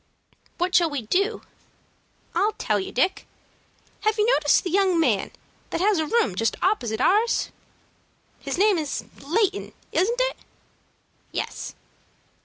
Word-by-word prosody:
"What 355 +1 -1
shall 340 -2 +5
we 285 -5 -3
do?" 395 - 0 0.9
"I'll 425 +2 +2
tell 210 - 0
you, 190 - -5
Dick. 370 +9 0 0.7
Have 430 0 +1
you 425 - +3
noticed 295 -1 +3
the 360 - -3
young 375 -2 +3
man 325 - +2 0.4
that - - -2
has 395 -1 +3
a 315 - 0
room 460 - +2
just 225 +5 0
opposite 240 - +1
ours?" 425 - +2 0.9
"His - - -4
name 400 -2 +4
is 300 -2 -3 0.2
Layton, 390 +7 0 0.2
isn't 470 +7 +1
it?" - - 0 0.9
"Yes." - - -4
370 Hz, 135 wpm, -24 LUFS, 300-425 Hz, 0.9 s, shall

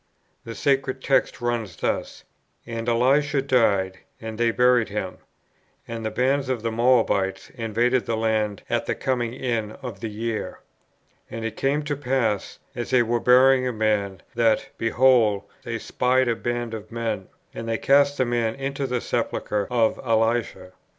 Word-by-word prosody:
The 115 - -7
sacred 135 -2 0
text 135 -2 +1
runs 120 -7 -2
thus: - - -3 0.4
"And 115 0 -4
Elisha 135 +5 +3
died, 105 -8 +2 0.2
and 110 -1 -7
they 120 0 +3
buried 125 -1 +3
him. 100 -3 -4 0.7
And 115 -1 -5
the 110 - -1
bands 130 +4 0
of 125 -4 -2
the 115 - -1
Moabites 110 -5 +1
invaded 120 +2 0
the 115 - 0
land 110 -2 0
at - - -1
the - - 0
coming 120 -3 -1
in 115 -5 -2
of 125 -3 -6
the 115 - -4
year. 110 +1 -4 0.7
And 115 0 -5
it 110 -1 -4
came 145 +2 0
to 145 0 -2
pass, 125 -7 -1 0.2
as 120 0 -4
they 125 -2 +4
were 120 +1 0
burying 130 +1 +5
a - - 0
man, 105 -4 -1
that, 115 +3 +2
behold, 115 -3 +3 0.2
they - - -4
spied 130 +1 +1
a 120 - +1
band 120 0 -3
of 110 0 -7
men; 115 -5 -3 0.3
and 115 - -6
they 115 - 0
cast 140 +3 +3
the 130 - +2
man 120 -2 0
into 135 0 -3
the 125 -2 -1
sepulchre 105 -1 -2
of 115 -3 +1
Elisha. 115 -5 0
115 Hz, 165 wpm, -24 LUFS, 110-130 Hz, 0.7 s, burying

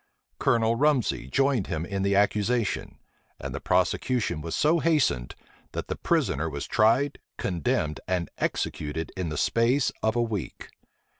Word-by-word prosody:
Colonel 115 -1 +3
Rumsey 140 - +1
joined 135 - +1
him 80 +1 -2
in 100 +1 -3
the 100 0 +2
accusation; 105 +2 +1 0.4
and - - -5
the - - -4
prosecution 120 -11 0
was 80 +1 -4
so 160 +3 +3
hastened, 145 - +1 0.4
that - - -4
the - - -1
prisoner 75 +4 0
was 70 -2 -5
tried, 130 +7 +2 0.2
condemned, 75 -3 -1
and 90 -2 0
executed 80 +2 -2
in 90 -3 -2
the 75 - -4
space 120 - +2
of 110 +1 +1
a 120 - +2
week. 105 -7 -5
105 Hz, 145 wpm, -27 LUFS, 80-125 Hz, 0.4 s, Colonel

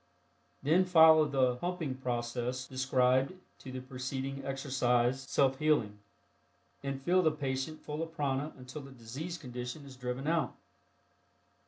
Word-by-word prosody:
Then 165 +6 +4
follow 160 -3 +7
the 130 -4 +2
"pumping" 175 -3 -2
process 125 0 -2
described 130 +3 +2 0.2
to 130 - -9
the 130 0 -5
preceding 135 +1 -4
exercise 130 -2 +1
(Self 135 -1 +2
Healing) 120 -10 +2 0.8
and 140 -1 -4
fill 180 +4 +4
the 160 - +4
patient 145 0 -3
full 150 +1 -4
of 165 0 -4
prana 145 0 -1
until 125 +3 -8
the 135 - -11
diseased 135 +8 -7
condition 125 +2 -6
is 135 -1 -11
driven 125 +1 -4
out. 165 0 +1
135 Hz, 135 wpm, -32 LUFS, 125-150 Hz, 0.8 s, follow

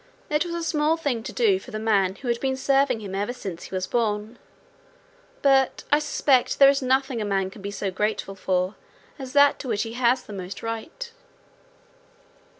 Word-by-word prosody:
It 300 +1 +2
was 340 -1 -4
a 340 - -3
small 310 0 +1
thing 280 -8 -1
to 240 +2 -6
do 215 -7 +2
for - - -13
the 215 - -5
man 200 -4 +1
who 255 - -9
had 235 -1 0
been 265 -1 -1
serving 270 -3 +2
him 195 -2 -7 0.2
since 250 - -14
ever 170 -4 -6
he - - -6
was 185 0 -1
born, 220 0 -1 1.0
but 270 -1 +3
I 295 - +5
suspect 275 -4 +2
there 275 0 +8
is 280 +1 -1
nothing 260 -2 +1
a - - 0
man 195 -2 -1
can 200 - -12
be 200 - -4
so 200 -1 -3
grateful 210 +1 -2
for 185 0 -1 0.5
as 260 -1 -7
that 285 0 +5
to 270 - -7
which 215 -4 0
he 225 -1 -6
has 250 +1 +2
the 210 - -10
most 185 -1 -7
right. 230 - -5
235 Hz, 200 wpm, -24 LUFS, 200-275 Hz, 1.0 s, there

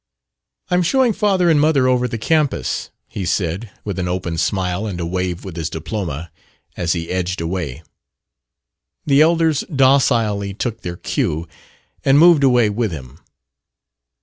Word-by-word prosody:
"I'm 180 0 +3
showing 250 +6 +2
father 195 -4 +2
and 155 -3 +4
mother 145 -4 +3
over 125 -1 +2
the 115 - -4
campus," 140 - 0 0.2
he 100 - -6
said, 90 +4 -2 0.2
with 100 -3 -3
an 90 - -1
open 90 -2 -3
smile 90 +3 -1
and 90 -4 -5
a 85 - -2
wave 90 +1 -3
with 95 -4 -7
his 80 -2 -3
diploma, 80 -2 -5 0.4
as 85 -1 0
he 85 -1 -4
edged 90 0 -2
away. 85 -4 -4 1.2
The 140 0 +4
elders 160 -2 +3
docilely 120 -8 +2
took 115 0 -3
their 85 -1 -6
cue, 80 0 -2 0.6
and 135 +1 +4
moved 165 -2 +6
away 125 -4 +4
with 110 -1 -1
him. 65 -6 -9
100 Hz, 150 wpm, -19 LUFS, 85-140 Hz, 1.2 s, moved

